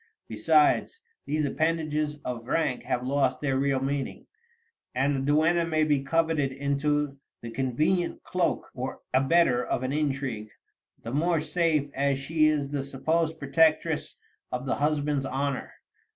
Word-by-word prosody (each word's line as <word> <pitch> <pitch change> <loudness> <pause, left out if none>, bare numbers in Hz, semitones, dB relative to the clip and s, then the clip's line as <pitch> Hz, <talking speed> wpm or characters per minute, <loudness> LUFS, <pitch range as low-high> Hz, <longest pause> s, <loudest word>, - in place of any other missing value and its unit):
Besides, 370 +4 +2 0.3
these 150 +1 0
appendages 155 0 0
of 120 -2 -5
rank 150 -5 0
have 125 -1 -1
lost 135 -1 +1
their 135 -2 0
real 135 -1 +1
meaning, 135 0 -3 0.7
and 135 +3 +2
the - - +3
duenna 165 +3 +3
may 160 -2 +1
be 145 -3 +2
converted 160 -1 +1
into 140 +1 -1 0.2
the 115 - -7
convenient 155 +9 0
cloak 180 -1 -1
or 130 +1 -5
abettor 135 -1 +3
of 125 - -2
an 130 +2 -1
intrigue, 135 -7 -2 0.5
the 115 - -5
more 165 +3 +2
safe 155 -2 0
as 140 0 +1
she 155 +3 +2
is 145 -2 0
the 145 -2 -1
supposed 160 +4 -1
protectress 155 +2 +2 0.4
of 125 +1 -3
the 130 - 0
husband's 145 -1 0
honor. 135 0 -2
145 Hz, 140 wpm, -27 LUFS, 135-155 Hz, 0.7 s, the